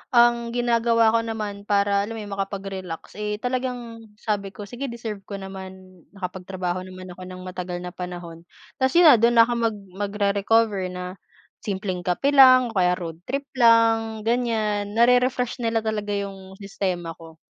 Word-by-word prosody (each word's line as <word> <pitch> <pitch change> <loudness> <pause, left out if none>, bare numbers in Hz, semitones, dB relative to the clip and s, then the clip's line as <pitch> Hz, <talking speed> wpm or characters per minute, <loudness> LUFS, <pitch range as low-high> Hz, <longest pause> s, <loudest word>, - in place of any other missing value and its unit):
Ang 235 0 +4
ginagawa 230 -2 +3
ko 230 - +3
naman 210 -3 -5
para, 200 0 +2
alam 225 - -6
mo - - -6
'yon, 205 - -9
makapag-relax, 195 -2 -5
eh, 210 0 -2
talagang 245 -3 -3
sabi 200 -2 -3
ko, 210 - -7
"Sige 245 +7 -6
deserve 230 -3 -6
ko 200 - -5
naman. 190 -1 -9 0.2
Nakapagtrabaho 185 -1 -4
naman 185 0 -10
ako 185 +1 -10
nang 185 0 -9
matagal 180 -1 -5
na 180 - -6
panahon." 175 -2 -8 0.3
Tas 260 +4 +1
'yon 350 - +7
na, 240 - +6
do'n 235 +2 +4
na 230 - +9
ako 240 +1 -1
mag 220 - -3 0.3
magre-recover 200 0 +1
na 180 +1 -7 0.4
simpleng 190 -2 -3
kape 180 +11 0
lang 255 -3 +7
o - - -13
kaya 180 0 +3
road 165 -3 -7
trip 275 +2 -2
lang, 225 -3 +3
ganiyan. 220 -3 0
Nare-refresh 250 +1 +3
nila 225 -1 0
talaga 210 -2 -2
'yong 195 -1 -6
sistema 190 -4 -3
ko. 165 -1 -13
205 Hz, 165 wpm, -24 LUFS, 185-230 Hz, 0.4 s, na